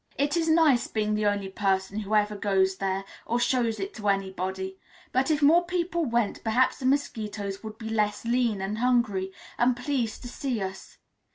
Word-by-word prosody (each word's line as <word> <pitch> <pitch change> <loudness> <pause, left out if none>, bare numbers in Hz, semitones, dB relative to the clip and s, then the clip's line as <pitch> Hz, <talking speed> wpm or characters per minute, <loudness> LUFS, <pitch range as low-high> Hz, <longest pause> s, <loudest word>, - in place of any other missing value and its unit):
It 285 +2 +1
is 330 -1 +1
nice 315 -6 +4
being 215 -1 -1
the 210 0 +1
only 205 -1 0
person 195 0 0
who 215 0 -1
ever 210 0 +2
goes 190 -2 +1
there 195 0 -1 0.2
or 240 +1 -1
shows 240 -2 +1
it 390 +1 -4
to 210 -2 -2
anybody, 190 -1 -2 0.3
but 260 +3 +1
if 305 -1 +1
more 330 +5 +6
people 345 -1 -1
went, 235 -4 0
perhaps 240 +3 +2
the 255 - -1
mosquitoes 210 -7 -1
would 220 -1 -8
be 220 -1 -6
less 210 -1 0
lean, 235 -4 +1
and 205 +3 -3
hungry, 230 -6 +1 0.3
and 240 0 +3
pleased 250 -3 -2
to - - -6
see 250 -1 -3
us. 190 -1 -6
220 Hz, 185 wpm, -27 LUFS, 200-255 Hz, 0.3 s, more